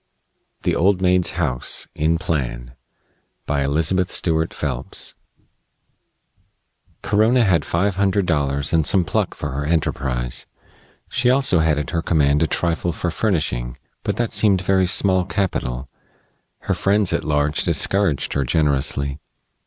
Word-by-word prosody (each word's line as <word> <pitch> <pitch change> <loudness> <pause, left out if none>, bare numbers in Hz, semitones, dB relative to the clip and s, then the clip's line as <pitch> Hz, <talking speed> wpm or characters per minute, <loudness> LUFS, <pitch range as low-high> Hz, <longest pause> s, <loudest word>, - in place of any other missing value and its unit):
THE - - +1
OLD 95 +2 +2
MAID'S 90 -1 +2
HOUSE: 70 -8 -2
IN 80 +2 +1
PLAN 60 -8 -3 0.7
BY 70 -1 -1
ELIZABETH 80 +6 +1
STUART 80 -1 0
PHELPS 65 -5 -5 1.9
Corona 110 +4 +3
had 85 -6 +2
five 95 +3 -1
hundred 100 0 +1
dollars 70 -4 0
and 80 -3 +2
some 95 -3 +3
pluck - - -1
for - - -5
her 70 +2 -3
enterprise. 65 -6 -2 0.6
She 125 - -1
had 125 - +5
also 135 -10 +2
at 75 -3 0
her 85 -1 -1
command 75 -3 +2
a 80 - +3
trifle 85 +1 -1
for 85 +1 -3
furnishing. 75 - -1 0.2
But - - -2
that 120 -2 -1
seemed 100 -4 +3
very 95 -1 +2
small 95 0 +2
capital. 85 - -2 0.7
Her - - -1
friends 100 -1 +1
at - - -1
large 75 0 0
discouraged 100 -8 +1
her 70 - 0
generously. 70 0 +1
80 Hz, 135 wpm, -21 LUFS, 70-95 Hz, 1.9 s, had